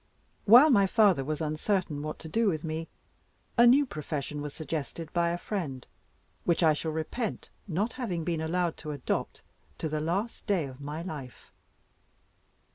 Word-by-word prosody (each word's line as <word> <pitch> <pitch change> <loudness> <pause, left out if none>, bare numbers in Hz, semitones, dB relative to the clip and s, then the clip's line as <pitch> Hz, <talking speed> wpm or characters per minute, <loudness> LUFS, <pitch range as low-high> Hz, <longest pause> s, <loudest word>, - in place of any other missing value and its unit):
While 245 +9 +9
my 200 -5 +5
father 195 - +4
was 155 +3 -3
uncertain 155 0 -1
what 155 +1 -4
to 160 - -9
do 225 +8 +1
with 155 -6 0
me, 160 0 -3 0.7
a 240 0 +7
new 275 +4 +6
profession 150 - -4
was 145 0 -4
suggested 155 +1 -5
by 170 -1 +2
a 170 - -1
friend, 160 -11 -4 0.6
which 170 0 +2
I 160 -1 +6
shall 160 +2 -3
repent 160 +8 -4 0.2
not 200 +6 -1
having 185 - -3
been 165 -1 -1
allowed 170 +1 0
to 155 - -7
adopt, 140 - -3 0.3
to - - -2
the 155 0 -2
last 195 +11 -2
day 190 -7 +2
of 130 0 -10
my 150 +3 -5
life. 145 -8 -8
165 Hz, 165 wpm, -29 LUFS, 155-195 Hz, 0.7 s, While